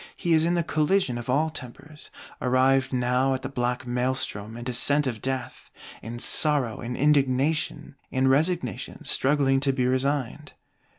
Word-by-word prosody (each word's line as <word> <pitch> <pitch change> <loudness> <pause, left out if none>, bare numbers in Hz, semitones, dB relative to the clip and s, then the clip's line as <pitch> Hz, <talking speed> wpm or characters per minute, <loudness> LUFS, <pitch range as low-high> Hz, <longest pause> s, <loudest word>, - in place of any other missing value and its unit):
He 170 - 0
is 160 0 +4
in 175 +1 +1
the 170 - +1
collision 155 -5 0
of 120 - -8
all 155 +5 +1
tempers; 145 +2 -10 0.3
arrived 130 +1 +2
now 125 +1 +1
at 130 - -7
the 135 - -4
black 125 -1 -2
Maelstrom 120 -3 -3
and 120 - -8
descent 140 +4 +3
of 120 -5 -3
Death: 130 -1 -5 0.3
in 115 +2 -7
sorrow, 140 -2 +1
in 125 +1 -5
indignation, 145 +2 +1 0.2
in 130 0 +1
resignation 145 - -1
struggling 135 -1 +2
to 135 0 +2
be 130 -2 -1
resigned. 130 0 -1
130 Hz, 155 wpm, -25 LUFS, 125-145 Hz, 0.3 s, is